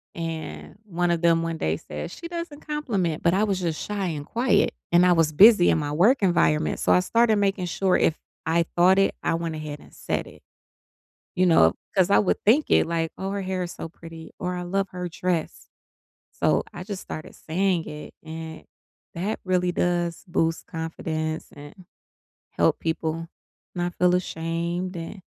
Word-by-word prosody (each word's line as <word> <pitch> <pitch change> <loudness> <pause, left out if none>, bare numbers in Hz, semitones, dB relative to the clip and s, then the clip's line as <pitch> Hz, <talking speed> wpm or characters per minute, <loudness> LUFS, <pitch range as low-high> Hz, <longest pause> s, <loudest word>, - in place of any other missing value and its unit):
and 165 +1 -6
one 175 -2 0
of 170 -1 0
them 165 -1 +4
one 165 -1 -3
day 80 - 0
said, 75 - -7
"She 335 - -8
doesn't 335 -4 -6
compliment," 220 - -2
but 170 +1 +3
I 200 - +2
was 195 -3 0
just 165 -3 -2
shy 200 -3 -2
and 150 -3 -4
quiet, 240 - +2 0.2
and 175 +1 +6
I 180 - +5
was 165 -3 +3
busy 205 +1 +7
in - - +3
my 145 -2 -2
work 205 - +4
environment, 80 - +2
so - - +1
I 90 - +5
started 230 - +3
making 195 -2 0
sure, 185 +2 +1
if 160 - +2 0.3
I 165 +1 +2
thought 185 +2 +6
it, 195 - +3
I - - 0
went 165 -1 -2
ahead 150 -1 -6
and - - -18
said - - -3
it, - - -15 0.9
you 185 0 +3
know? 120 - +5 0.2
'Cause 185 0 +3
I - - +5
would 200 - 0
think 260 +9 +4
it, - - +4
like, 165 -1 -1
"Oh, 190 - -3
her 200 0 -2
hair 185 -1 -2
is 175 - -5
so 165 - -7
pretty," 165 -1 -11
or, 180 0 -2
"I 180 - -4
love 195 +2 -1
her 180 -1 -5
dress." 175 -1 -3 0.6
So - - +1
I 175 - -7
just 200 -3 -5
started 155 - -8
saying 180 0 0
it, 150 0 -9
and 160 0 -8 0.5
that 195 +6 -3
really 180 -1 +1
does 175 -1 -1
boost 165 -1 0
confidence 160 -1 -4
and 145 +6 -13 0.6
help - - +1
people 165 0 -2 0.5
not 175 0 -2
feel 180 0 +3
ashamed 170 +1 -3
and 165 +3 -7
175 Hz, 185 wpm, -25 LUFS, 160-190 Hz, 0.9 s, busy